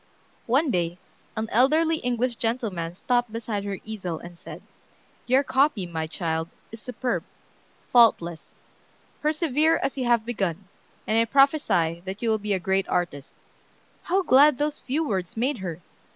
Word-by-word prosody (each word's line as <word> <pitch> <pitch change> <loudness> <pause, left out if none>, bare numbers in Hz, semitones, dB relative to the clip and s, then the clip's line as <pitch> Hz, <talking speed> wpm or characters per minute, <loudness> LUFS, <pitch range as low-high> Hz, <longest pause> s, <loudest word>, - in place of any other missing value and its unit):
One 270 +4 +2
day 175 -2 -1 0.4
an 220 0 -1
elderly 310 +7 +3
English 245 -2 -1
gentleman 205 -8 -2
stopped 245 +3 0
beside 220 -3 -3
her 200 -1 -3
easel, 190 -7 -4
and 175 +2 -11
said: - - -11 0.6
"Your 260 +3 +4
copy, 270 -8 +2
my 160 -2 -4
child, 160 -1 -3 0.2
is 225 -1 -10
superb, 250 +1 -2 0.7
faultless. 175 -9 +3 0.7
Persevere 310 +1 +2
as 275 - -2
you 255 - -1
have 235 -2 +2
begun, 195 -5 -3 0.4
and 220 +1 +2
I 230 - +4
prophesy 250 - +2
that 195 +4 -6
you 230 - +2
will 220 - +1
be 210 0 -1
a 190 - 0
great 190 +2 0
artist." 155 -5 -2 0.7
How 375 +2 +1
glad 285 -2 +6
those 295 +1 -1
few 295 +4 -2
words 190 -2 -3
made 250 +2 0
her! 180 -3 -5
225 Hz, 150 wpm, -25 LUFS, 180-265 Hz, 0.7 s, glad